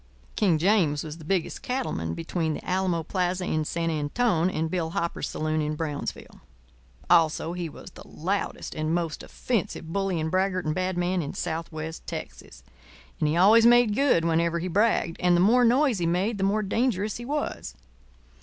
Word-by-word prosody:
King 185 Hz, -6 st, +3 dB
James 165 Hz, -5 st, +2 dB
was 155 Hz, +1 st, -8 dB
the -, -, -11 dB
biggest 180 Hz, +2 st, -1 dB
cattleman 85 Hz, -, -3 dB
between 165 Hz, -2 st, -2 dB
the -, -, -9 dB
Alamo 180 Hz, -3 st, 0 dB
plaza 180 Hz, +1 st, -1 dB
in 155 Hz, -2 st, 0 dB
San 165 Hz, +2 st, -2 dB
Antone 165 Hz, +4 st, +1 dB
and 160 Hz, -2 st, -2 dB
Bill 170 Hz, -3 st, -1 dB
Hopper's 170 Hz, 0 st, -2 dB
saloon 155 Hz, 0 st, -1 dB
in 150 Hz, 0 st, -2 dB
Brownsville. 150 Hz, -2 st, -5 dB, 0.7 s
Also 160 Hz, 0 st, +3 dB
he 175 Hz, -2 st, -4 dB
was -, -, -12 dB
the -, -, -13 dB
loudest 190 Hz, +5 st, -3 dB
and 155 Hz, +1 st, -1 dB
most 165 Hz, -3 st, -2 dB
offensive 175 Hz, -8 st, -3 dB
bully 195 Hz, -3 st, 0 dB
and 160 Hz, 0 st, -2 dB
braggart 185 Hz, -1 st, 0 dB
and 155 Hz, -, 0 dB
bad 185 Hz, +1 st, -2 dB
man 180 Hz, +1 st, 0 dB
in 145 Hz, -, -6 dB
southwest 160 Hz, 0 st, -5 dB
Texas. -, -, -8 dB, 0.6 s
And 150 Hz, -, +1 dB
he 160 Hz, -, 0 dB
always 220 Hz, +6 st, +6 dB
made 240 Hz, -2 st, +5 dB
good 245 Hz, -9 st, +3 dB
whenever 170 Hz, +1 st, +1 dB
he 170 Hz, +2 st, -3 dB
bragged; 190 Hz, -2 st, +1 dB
and 180 Hz, -1 st, +3 dB
the -, -, +2 dB
more 230 Hz, +7 st, +5 dB
noise 250 Hz, -1 st, +3 dB
he 170 Hz, -, 0 dB
made 195 Hz, +6 st, 0 dB
the -, -, 0 dB
more 210 Hz, +2 st, +1 dB
dangerous 210 Hz, -1 st, 0 dB
he 240 Hz, -, -8 dB
was. 295 Hz, +3 st, -3 dB
175 Hz, 180 wpm, -26 LUFS, 160-200 Hz, 0.7 s, always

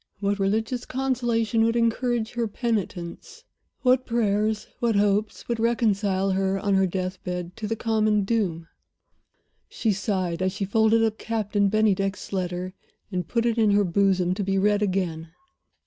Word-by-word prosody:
What 200 Hz, 0 st, -1 dB
religious 220 Hz, +5 st, 0 dB
consolations 240 Hz, -4 st, 0 dB
would 230 Hz, +1 st, +2 dB
encourage 235 Hz, 0 st, 0 dB
her 235 Hz, -1 st, -1 dB
penitence? 205 Hz, -6 st, -4 dB, 0.4 s
What 255 Hz, 0 st, +3 dB
prayers, 215 Hz, -2 st, 0 dB
what 235 Hz, -2 st, +1 dB
hopes, 205 Hz, +1 st, +1 dB
would 235 Hz, -1 st, -2 dB
reconcile 205 Hz, -5 st, +1 dB
her, 190 Hz, 0 st, 0 dB
on 200 Hz, 0 st, 0 dB
her 190 Hz, 0 st, +3 dB
death 185 Hz, 0 st, -4 dB
bed, 180 Hz, -1 st, -5 dB
to 215 Hz, -, -4 dB
the 225 Hz, -, -1 dB
common 215 Hz, -2 st, +1 dB
doom? 195 Hz, -7 st, -1 dB, 1.0 s
She 225 Hz, -, 0 dB
sighed 185 Hz, -4 st, -2 dB
as 185 Hz, 0 st, 0 dB
she 195 Hz, -, -2 dB
folded 220 Hz, +3 st, +3 dB
up 220 Hz, -1 st, 0 dB
Captain 210 Hz, -3 st, 0 dB
Bennydeck's 200 Hz, -2 st, 0 dB
letter 180 Hz, 0 st, -3 dB, 0.4 s
and 180 Hz, -3 st, -2 dB
put 235 Hz, +4 st, 0 dB
it 235 Hz, -1 st, +1 dB
in 220 Hz, -2 st, +4 dB
her 205 Hz, 0 st, +4 dB
bosom, 185 Hz, -1 st, +2 dB
to 200 Hz, +2 st, -2 dB
be 195 Hz, 0 st, 0 dB
read 205 Hz, +1 st, +2 dB
again. 180 Hz, -5 st, -1 dB
205 Hz, 155 wpm, -25 LUFS, 190-225 Hz, 1.0 s, in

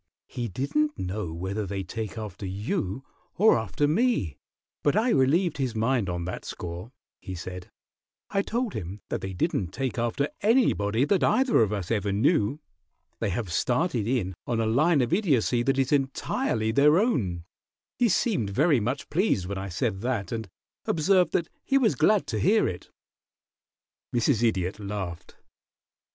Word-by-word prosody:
"He 120 Hz, -2 st, -4 dB
didn't 150 Hz, -, -1 dB
know 95 Hz, -1 st, -3 dB
whether 95 Hz, +5 st, -3 dB
they 95 Hz, 0 st, -3 dB
take 110 Hz, +2 st, -5 dB
after 105 Hz, -2 st, -6 dB
you 105 Hz, -, -3 dB, 0.3 s
or 215 Hz, +4 st, +6 dB
after 110 Hz, +7 st, 0 dB
me, 155 Hz, -, +1 dB, 0.4 s
but 145 Hz, -, +2 dB
I 225 Hz, +4 st, +3 dB
relieved 160 Hz, +3 st, +2 dB
his 130 Hz, -4 st, -2 dB
mind 115 Hz, -2 st, +1 dB
on 85 Hz, -1 st, -3 dB
that 90 Hz, -, -5 dB
score," 90 Hz, +6 st, -7 dB, 0.3 s
he 95 Hz, -, -7 dB
said. 90 Hz, +1 st, -7 dB, 0.6 s
"I 195 Hz, -, +2 dB
told 235 Hz, +2 st, -2 dB
him 95 Hz, +1 st, -6 dB
that -, -, -2 dB
they 95 Hz, 0 st, -5 dB
didn't 90 Hz, +1 st, 0 dB
take 130 Hz, +5 st, -3 dB
after 120 Hz, +5 st, 0 dB
anybody 135 Hz, -, +3 dB
that 195 Hz, +4 st, +2 dB
either 260 Hz, -, +3 dB
of 105 Hz, -2 st, +2 dB
us 100 Hz, -3 st, -3 dB
ever 105 Hz, -3 st, 0 dB
knew. 115 Hz, -, +2 dB, 0.6 s
They -, -, 0 dB
have 95 Hz, -2 st, -3 dB
started 125 Hz, -, 0 dB
in 115 Hz, -7 st, 0 dB
on 115 Hz, -2 st, 0 dB
a 115 Hz, -, +1 dB
line 145 Hz, +7 st, +3 dB
of 120 Hz, -, -1 dB
Idiocy 135 Hz, -, +2 dB
that 135 Hz, +3 st, +1 dB
is 135 Hz, -1 st, +1 dB
entirely 130 Hz, -5 st, 0 dB
their 150 Hz, +6 st, +5 dB
own. 105 Hz, -, 0 dB, 0.6 s
He 240 Hz, -2 st, +4 dB
seemed 180 Hz, -, +1 dB
very 140 Hz, -, +3 dB
much 125 Hz, +6 st, -2 dB
pleased 165 Hz, -, +1 dB
when 95 Hz, +1 st, -4 dB
I 100 Hz, 0 st, -5 dB
said 95 Hz, +2 st, -1 dB
that, 115 Hz, -6 st, -2 dB
and 110 Hz, -4 st, -4 dB, 0.4 s
observed 180 Hz, +3 st, +3 dB
that 170 Hz, -, +1 dB, 0.2 s
he 275 Hz, -, +2 dB
was 245 Hz, -5 st, +3 dB
glad 210 Hz, -2 st, +3 dB
to -, -, -3 dB
hear 215 Hz, +4 st, +3 dB
it." 90 Hz, -, -6 dB, 1.3 s
Mrs. 120 Hz, 0 st, +2 dB
Idiot 95 Hz, -4 st, 0 dB
laughed. 100 Hz, -4 st, -6 dB
115 Hz, 165 wpm, -26 LUFS, 100-150 Hz, 1.3 s, or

